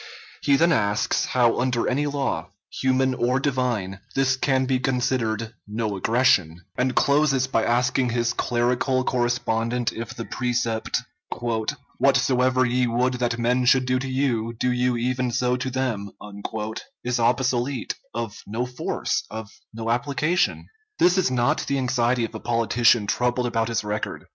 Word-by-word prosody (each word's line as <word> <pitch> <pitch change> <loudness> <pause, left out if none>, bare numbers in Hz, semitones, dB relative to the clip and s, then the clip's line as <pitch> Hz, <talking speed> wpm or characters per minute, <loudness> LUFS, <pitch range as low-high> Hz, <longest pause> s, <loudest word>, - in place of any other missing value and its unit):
He 140 - +3
then 170 +4 +4
asks, 105 -7 +1
how 120 -2 +2
under 125 -2 0
any 145 +3 0
law, 135 - -2 0.3
human 130 0 +2
or 125 +1 +1
divine, 125 -9 -1 0.2
this 135 -1 +2
can 130 0 +1
be 130 -1 +1
considered 120 -4 -1
"no 105 -1 -2
aggression," 100 -6 +2
and 125 0 0
closes 140 -2 +3
by 120 -4 0
asking 125 +2 +1
his 120 0 0
clerical 125 +2 +1
correspondent 120 -1 0
if 115 +2 -6
the 115 - -5
precept, 120 -2 -1 1.0
"Whatsoever 130 0 +3
ye 125 +1 +1
would 125 +2 +1
that 120 -2 0
men 125 +2 +1
should 130 +1 +4
do 125 0 +1
to 135 +1 -4
you, 120 -4 -1
do 125 - +1
you 125 0 +1
even 125 +1 0
so 125 +1 +1
to 130 +1 -3
them," 125 -6 -2 0.9
is 125 0 -1
obsolete, 125 +1 0 0.2
of 115 -3 -5
no 115 +4 -2
force, 125 0 -2
of 110 -1 -7 0.2
no 115 +1 -3
application? 145 +8 0 0.3
This 180 0 +4
is 185 - +2
not 120 -1 +1
the 140 - 0
anxiety 125 -2 +1
of 115 - -9
a 110 - -6
politician 115 -1 +2
troubled 125 +3 0
about 115 -2 0
his 115 -2 -1
record. 105 0 -4
125 Hz, 150 wpm, -24 LUFS, 115-130 Hz, 1.0 s, then